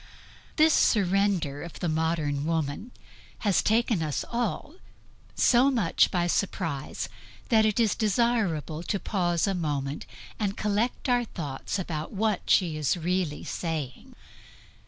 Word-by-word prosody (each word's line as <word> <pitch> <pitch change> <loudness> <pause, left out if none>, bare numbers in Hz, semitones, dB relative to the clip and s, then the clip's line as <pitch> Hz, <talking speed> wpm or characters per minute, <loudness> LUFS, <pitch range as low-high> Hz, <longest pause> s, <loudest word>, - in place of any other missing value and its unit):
This 310 0 +5
surrender 195 - +2
of 170 - -8
the 175 - -1
modern 155 -3 0
woman 160 - -2 0.5
has 200 -5 +3
taken 225 -3 +2
us 150 -3 -2
all 240 +5 -2 0.6
so 250 +3 +5
much 230 -11 +2
by 175 -2 0
surprise 165 -6 -2 0.4
that 220 -2 +5
it 215 +2 0
is 225 -4 +3
desirable 205 -8 0
to 195 +3 -2
pause 175 -5 0
a 195 - 0
moment, 145 -5 -3 0.3
and 205 -2 -1
collect 210 +6 -1
our 245 -2 +2
wits 145 +2 -3
about 160 -5 -4
what 210 -1 -1
she 170 -5 +3
is 155 +3 +1
really 175 -2 -1
saying. 155 -7 -5
180 Hz, 130 wpm, -27 LUFS, 155-215 Hz, 0.6 s, This